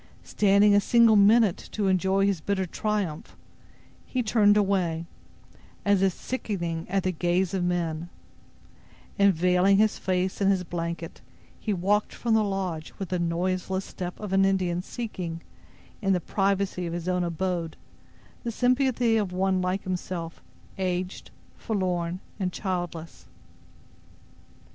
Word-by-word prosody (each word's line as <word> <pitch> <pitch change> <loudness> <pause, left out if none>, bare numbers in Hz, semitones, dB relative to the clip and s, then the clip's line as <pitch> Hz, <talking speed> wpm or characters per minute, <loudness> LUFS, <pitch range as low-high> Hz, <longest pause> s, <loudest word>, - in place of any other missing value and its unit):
Standing 205 0 +4
a 205 - +5
single 230 0 +5
minute 210 -1 +4
to 205 -2 0
enjoy 190 +1 +2
his 195 -5 0
bitter 195 0 -1
triumph, 195 -4 -3 0.7
he 255 -1 -2
turned 210 -2 +4
away, 185 -5 +1 0.8
as 200 -2 +3
if 195 -1 +3
sickening 170 -10 -4
at 195 -1 0
the 185 - +1
gaze 180 +2 0
of 190 -2 0
men, 170 -2 -1 1.1
and, 200 0 +6
veiling 180 +3 +3
his 215 +1 +2
face 185 +1 -1
in 195 - +4
his 190 -2 +2
blanket, 170 -1 -5 0.4
he 215 - -2
walked 205 +3 +1
from 235 -2 0
the 220 -1 +4
lodge 190 -6 -3
with 195 - -5
the 180 - -1
noiseless 185 +3 -1
step 180 -1 -6
of 210 -3 -5
an 195 0 +4
Indian 185 -2 +1
seeking, 180 -7 -6 0.6
in 195 -2 +2
the 180 - +2
privacy 195 -1 -1
of 165 - -4
his 170 0 -4
own 180 -1 +1
abode, 170 -1 -2 0.7
the 235 - -2
sympathy 250 -1 +2
of 205 -4 -1
one 185 0 +1
like 185 +2 -1
himself, 180 -2 -4 0.4
aged, 185 0 -3 0.3
forlorn 180 -4 -2 0.2
and 185 -2 -1
childless. 175 -4 -5
190 Hz, 140 wpm, -26 LUFS, 175-200 Hz, 1.1 s, and